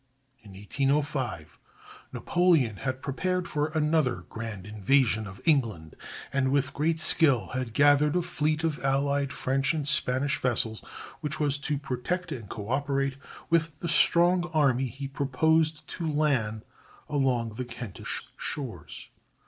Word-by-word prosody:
In 105 Hz, -3 st, -14 dB
1805 135 Hz, -, -2 dB, 0.5 s
Napoleon 165 Hz, -, +2 dB
had 130 Hz, +2 st, -4 dB
prepared 180 Hz, +6 st, -1 dB
for 150 Hz, 0 st, -1 dB
another 155 Hz, -3 st, +1 dB
grand 110 Hz, -4 st, -6 dB
invasion 110 Hz, +1 st, +1 dB
of 95 Hz, 0 st, -11 dB
England, 110 Hz, -, +1 dB, 0.4 s
and 135 Hz, -1 st, +2 dB
with 140 Hz, -1 st, +1 dB
great 160 Hz, +2 st, 0 dB
skill 135 Hz, -, +3 dB
had 125 Hz, -3 st, -4 dB
gathered 145 Hz, +1 st, +4 dB
a 180 Hz, -, +2 dB
fleet 155 Hz, -2 st, -1 dB
of 155 Hz, -4 st, -1 dB
allied 140 Hz, +1 st, +1 dB
French 135 Hz, +2 st, 0 dB
and 150 Hz, -3 st, -2 dB
Spanish 140 Hz, -1 st, +1 dB
vessels, 115 Hz, -3 st, -1 dB, 0.4 s
which 150 Hz, -1 st, -3 dB
was 145 Hz, -2 st, +1 dB
to 145 Hz, +1 st, -1 dB
protect 140 Hz, +7 st, -3 dB
and 115 Hz, -8 st, -6 dB
coöperate 135 Hz, +5 st, -1 dB, 0.3 s
with 165 Hz, -2 st, +1 dB
the 170 Hz, -, -3 dB
strong 175 Hz, +1 st, +4 dB
army 135 Hz, -4 st, +3 dB
he 135 Hz, +3 st, -6 dB
proposed 155 Hz, +3 st, +1 dB
to 165 Hz, -3 st, -3 dB
land 130 Hz, -8 st, 0 dB, 0.4 s
along 130 Hz, -6 st, 0 dB
the 125 Hz, +4 st, -4 dB
Kentish 115 Hz, -4 st, -5 dB
shores. 135 Hz, -6 st, -6 dB
140 Hz, 130 wpm, -27 LUFS, 125-155 Hz, 0.5 s, gathered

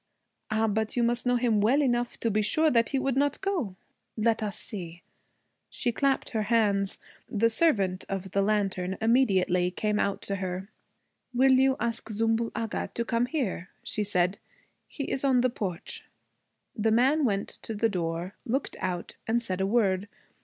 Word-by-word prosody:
'Ah, 220 Hz, +1 st, +1 dB
but 220 Hz, +2 st, -1 dB
you 240 Hz, -, +3 dB
must 240 Hz, +1 st, +1 dB
know 245 Hz, -, +3 dB
him 235 Hz, -4 st, +2 dB
well 245 Hz, +8 st, +4 dB
enough 245 Hz, -4 st, 0 dB
to 230 Hz, -, 0 dB
be 215 Hz, +1 st, +2 dB
sure 310 Hz, +10 st, +3 dB, 0.2 s
he 275 Hz, -, 0 dB
would 265 Hz, -1 st, 0 dB
not 285 Hz, +1 st, +1 dB
go. 355 Hz, -, -2 dB, 0.4 s
Let 225 Hz, +1 st, +2 dB
us 215 Hz, 0 st, -2 dB
see.' 175 Hz, -5 st, -6 dB, 0.7 s
She 245 Hz, -, -1 dB
clapped 270 Hz, +3 st, 0 dB
her 220 Hz, -, 0 dB
hands. 200 Hz, -4 st, +2 dB, 0.3 s
The 230 Hz, +2 st, +2 dB
servant 200 Hz, -, +2 dB
of 195 Hz, -1 st, -4 dB
the 200 Hz, -, +2 dB
lantern 195 Hz, -3 st, 0 dB
immediately 195 Hz, -7 st, +3 dB
came 210 Hz, +3 st, -1 dB
out 200 Hz, -, -1 dB
to 200 Hz, -, -3 dB
her. 185 Hz, +1 st, -4 dB, 0.7 s
'Will 265 Hz, +2 st, +5 dB
you 265 Hz, 0 st, +4 dB
ask 230 Hz, -1 st, -2 dB
Zümbül 225 Hz, +2 st, 0 dB
Agha 225 Hz, -1 st, -3 dB
to 235 Hz, -, -1 dB
come 235 Hz, +1 st, +1 dB
here?' 230 Hz, -, -2 dB
she 210 Hz, -, -2 dB
said. 185 Hz, -1 st, +1 dB, 0.5 s
'He 285 Hz, -, -5 dB
is 265 Hz, 0 st, -1 dB
on 260 Hz, -3 st, +4 dB
the 255 Hz, 0 st, +2 dB
porch.' 185 Hz, -7 st, -5 dB, 0.7 s
The 220 Hz, +1 st, +1 dB
man 265 Hz, +7 st, +3 dB
went 200 Hz, -6 st, 0 dB
to 225 Hz, -, -5 dB
the 225 Hz, +2 st, +2 dB
door, 175 Hz, -2 st, -3 dB
looked 265 Hz, +4 st, -2 dB
out, 180 Hz, -2 st, -4 dB
and 230 Hz, +1 st, +2 dB
said 190 Hz, -5 st, -3 dB
a 190 Hz, -, +1 dB
word. 200 Hz, -3 st, +2 dB
220 Hz, 175 wpm, -28 LUFS, 195-245 Hz, 0.7 s, Will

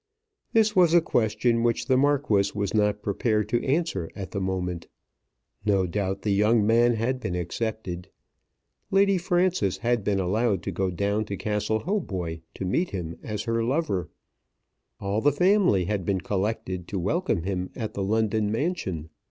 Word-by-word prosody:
This 220 Hz, -2 st, +3 dB
was 175 Hz, -2 st, +5 dB
a -, -, +9 dB
question 115 Hz, -5 st, +1 dB
which 115 Hz, 0 st, +1 dB
the 130 Hz, -, +3 dB
Marquis 135 Hz, -7 st, +2 dB
was 100 Hz, -1 st, -1 dB
not 105 Hz, -1 st, +1 dB
prepared 105 Hz, +1 st, 0 dB
to 120 Hz, -1 st, +1 dB
answer 135 Hz, -, 0 dB
at 95 Hz, -3 st, -6 dB
the 100 Hz, -, -3 dB
moment. 90 Hz, -2 st, -3 dB, 0.8 s
No 100 Hz, -3 st, +2 dB
doubt 95 Hz, +1 st, -2 dB
the 105 Hz, -, +1 dB
young 105 Hz, +2 st, +3 dB
man 120 Hz, +2 st, +4 dB
had 125 Hz, +4 st, -1 dB
been 90 Hz, -, -3 dB
accepted. 90 Hz, 0 st, -4 dB, 0.8 s
Lady 195 Hz, -1 st, +3 dB
Frances 175 Hz, -, +1 dB
had 120 Hz, -2 st, 0 dB
been 100 Hz, -1 st, +1 dB
allowed 100 Hz, +1 st, +1 dB
to -, -, -3 dB
go 95 Hz, -1 st, -1 dB
down 100 Hz, +4 st, -1 dB
to 100 Hz, -1 st, -5 dB
Castle 105 Hz, +1 st, -1 dB
Hautboy 95 Hz, -, -2 dB, 0.2 s
to 95 Hz, -, -4 dB
meet 170 Hz, -, 0 dB
him 85 Hz, -3 st, -5 dB
as 105 Hz, -2 st, -4 dB
her 115 Hz, 0 st, 0 dB
lover. 125 Hz, -, -1 dB, 0.9 s
All 100 Hz, +2 st, -1 dB
the 145 Hz, -, +4 dB
family 180 Hz, -, +3 dB
had 100 Hz, 0 st, -1 dB
been 95 Hz, +1 st, 0 dB
collected 95 Hz, -3 st, -2 dB
to 100 Hz, -, -4 dB
welcome 105 Hz, -, 0 dB
him 95 Hz, -1 st, -2 dB
at 110 Hz, -4 st, -4 dB
the 100 Hz, -, -3 dB
London 110 Hz, +1 st, +1 dB
mansion. 110 Hz, -, -2 dB
105 Hz, 165 wpm, -26 LUFS, 95-120 Hz, 0.9 s, a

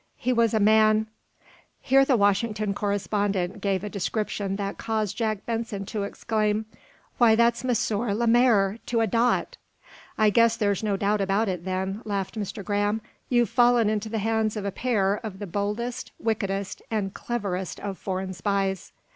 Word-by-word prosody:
He 250 Hz, +1 st, 0 dB
was 230 Hz, -2 st, +2 dB
a -, -, +3 dB
man 215 Hz, +1 st, +4 dB, 0.4 s
" -, -, -27 dB, 0.3 s
Here 270 Hz, +1 st, +4 dB
the 270 Hz, -2 st, +3 dB
Washington 210 Hz, 0 st, +1 dB
correspondent 200 Hz, -2 st, -1 dB
gave 195 Hz, -1 st, 0 dB
a -, -, -3 dB
description 200 Hz, 0 st, -2 dB
that 200 Hz, 0 st, -4 dB
caused 220 Hz, -3 st, -1 dB
Jack 215 Hz, -3 st, -2 dB
Benson 225 Hz, -4 st, -3 dB
to 210 Hz, +1 st, -4 dB
exclaim: 215 Hz, +1 st, -1 dB, 0.5 s
"Why, 230 Hz, -2 st, +6 dB
that's 235 Hz, +1 st, +2 dB
M. 255 Hz, -, -2 dB, 0.5 s
Lemaire, 230 Hz, -3 st, +3 dB
to 230 Hz, -1 st, +1 dB
a -, -, +3 dB
dot!" 240 Hz, -, +1 dB, 0.6 s
"I 215 Hz, -1 st, +4 dB
guess 230 Hz, +1 st, +4 dB
there's 205 Hz, -3 st, +1 dB
no 205 Hz, -3 st, 0 dB
doubt 205 Hz, +1 st, +1 dB
about 195 Hz, +3 st, +1 dB
it, 180 Hz, -2 st, -4 dB
then," 190 Hz, +2 st, -2 dB
laughed 200 Hz, -3 st, -3 dB
Mr. 205 Hz, -2 st, -5 dB
Graham. 205 Hz, +1 st, 0 dB, 0.3 s
"You've 240 Hz, -4 st, +2 dB
fallen 240 Hz, -3 st, +4 dB
into 215 Hz, 0 st, -2 dB
the 225 Hz, -, -2 dB
hands 220 Hz, 0 st, 0 dB
of 205 Hz, -, -4 dB
a 200 Hz, -, -1 dB
pair 205 Hz, -4 st, +1 dB
of 215 Hz, -4 st, -6 dB
the 205 Hz, -, -5 dB
boldest, 210 Hz, +6 st, -3 dB
wickedest 200 Hz, -3 st, -2 dB
and 205 Hz, -3 st, -2 dB
cleverest 195 Hz, -6 st, -3 dB
of 200 Hz, -2 st, -5 dB
foreign 190 Hz, 0 st, -3 dB
spies." 195 Hz, -1 st, -2 dB
210 Hz, 165 wpm, -25 LUFS, 195-225 Hz, 0.6 s, Why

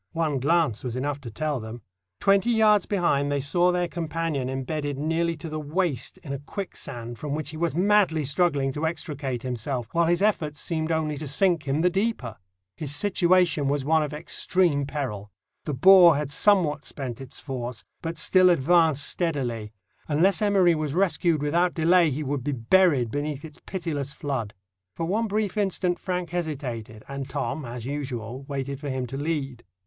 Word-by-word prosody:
One 160 Hz, -4 st, 0 dB
glance 155 Hz, -4 st, +1 dB
was 125 Hz, -2 st, -4 dB
enough 140 Hz, +2 st, -2 dB
to 125 Hz, -, -7 dB
tell 150 Hz, +4 st, -2 dB
them. 110 Hz, 0 st, -8 dB, 0.4 s
Twenty 195 Hz, +3 st, +3 dB
yards 215 Hz, -4 st, +4 dB
behind 145 Hz, -8 st, +1 dB
they 145 Hz, -, +1 dB
saw 175 Hz, +6 st, +2 dB
their 180 Hz, 0 st, 0 dB
companion 165 Hz, -5 st, -2 dB
embedded 145 Hz, +2 st, -3 dB
nearly 165 Hz, +3 st, 0 dB
to 165 Hz, +1 st, -8 dB
the 155 Hz, 0 st, -4 dB
waist 150 Hz, -4 st, -2 dB
in 140 Hz, -, -5 dB
a 140 Hz, -, -4 dB
quicksand, 120 Hz, -, -7 dB
from 145 Hz, +1 st, -3 dB
which 155 Hz, -1 st, -4 dB
he 155 Hz, -, -8 dB
was 165 Hz, -2 st, -1 dB
madly 185 Hz, -5 st, +3 dB
struggling 140 Hz, -2 st, +1 dB
to 150 Hz, +4 st, -1 dB
extricate 140 Hz, -6 st, -4 dB
himself, 125 Hz, -1 st, -3 dB
while 170 Hz, 0 st, +2 dB
his 175 Hz, +3 st, +2 dB
efforts 155 Hz, -8 st, 0 dB
seemed 160 Hz, -2 st, -2 dB
only 155 Hz, -2 st, -1 dB
to 150 Hz, +1 st, -5 dB
sink 165 Hz, +2 st, +2 dB
him 140 Hz, +3 st, +1 dB
the 180 Hz, -, +4 dB
deeper. 190 Hz, -, -2 dB, 0.4 s
His 145 Hz, -2 st, -3 dB
situation 180 Hz, -5 st, +2 dB
was 140 Hz, -1 st, 0 dB
one 160 Hz, +1 st, +3 dB
of 150 Hz, -2 st, -2 dB
extreme 150 Hz, -1 st, +1 dB
peril. 115 Hz, -9 st, -4 dB, 0.4 s
The 150 Hz, -, -2 dB
bore 180 Hz, +2 st, +8 dB
had 145 Hz, -1 st, -3 dB
somewhat 155 Hz, -5 st, +3 dB
spent 130 Hz, -3 st, -6 dB
its 135 Hz, -1 st, -9 dB
force, 125 Hz, -4 st, -6 dB, 0.2 s
but 165 Hz, 0 st, -4 dB
still 185 Hz, +3 st, +5 dB
advanced 160 Hz, -2 st, +3 dB
steadily. 125 Hz, -11 st, -2 dB, 0.4 s
Unless 170 Hz, +7 st, +2 dB
Emory 195 Hz, -4 st, +4 dB
was 155 Hz, -2 st, -2 dB
rescued 170 Hz, -4 st, +1 dB
without 170 Hz, +4 st, +1 dB
delay, 170 Hz, +1 st, +4 dB
he 145 Hz, +2 st, -3 dB
would 140 Hz, -2 st, -2 dB
be 145 Hz, -, -1 dB
buried 130 Hz, -1 st, +3 dB
beneath 145 Hz, +1 st, -3 dB
its 155 Hz, -2 st, -13 dB
pitiless 150 Hz, -7 st, -3 dB
flood. 125 Hz, -8 st, -3 dB, 0.4 s
For 165 Hz, -, -2 dB
one 215 Hz, +6 st, 0 dB
brief 210 Hz, 0 st, -1 dB
instant 185 Hz, -3 st, 0 dB
Frank 180 Hz, -3 st, -3 dB
hesitated, 130 Hz, -10 st, -4 dB
and 140 Hz, 0 st, -6 dB
Tom, 140 Hz, +1 st, -3 dB
as 120 Hz, -1 st, -7 dB
usual, 130 Hz, -3 st, -4 dB
waited 140 Hz, -1 st, -4 dB
for 145 Hz, -1 st, -5 dB
him 130 Hz, -1 st, -2 dB
to 125 Hz, -, -7 dB
lead. 140 Hz, -4 st, -3 dB
150 Hz, 175 wpm, -25 LUFS, 135-175 Hz, 0.4 s, bore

